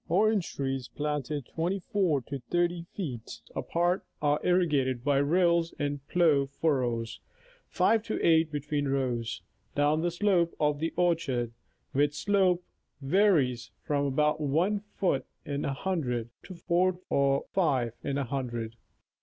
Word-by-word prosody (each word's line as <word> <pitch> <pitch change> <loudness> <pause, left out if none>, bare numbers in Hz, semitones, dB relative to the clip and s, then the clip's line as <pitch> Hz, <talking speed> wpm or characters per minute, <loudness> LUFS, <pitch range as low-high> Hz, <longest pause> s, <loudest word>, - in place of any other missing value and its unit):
Orange 205 +2 +2
trees 135 -2 -2
planted 150 -2 -3
24 175 -2 0
to 140 +3 -6
30 175 -1 0
feet 130 - -5
apart 175 +2 0 0.2
are 145 0 +2
irrigated 145 -9 +2
by 140 0 +2
rills 170 +2 +2
in 145 0 -2
plough 160 -6 +4
fuiTOws, 125 -6 -1 0.5
5 225 -1 +2
to 220 - -2
8 160 -1 +4
between 145 0 -2
rows, 125 -3 -1 0.3
down 145 +2 +2
the 175 - +1
slope 175 -1 +1
of 150 -1 +1
the 165 +1 -1
orchard, 145 -10 +1 0.4
which 145 +2 +2
slope 185 0 +2 0.4
varies 140 - +2
from 145 -1 0
about 150 +3 +1
1 165 +9 +1 0.2
foot 180 -8 +1 0.2
in 140 0 -3
a 140 - -1
hundred 130 -9 -2
to 185 - -10
4 175 +2 +1
or 140 0 +2
5 135 - +1
in 140 - -1
a 140 - 0
hundred. 120 -3 -4
150 Hz, 135 wpm, -29 LUFS, 135-175 Hz, 0.5 s, plough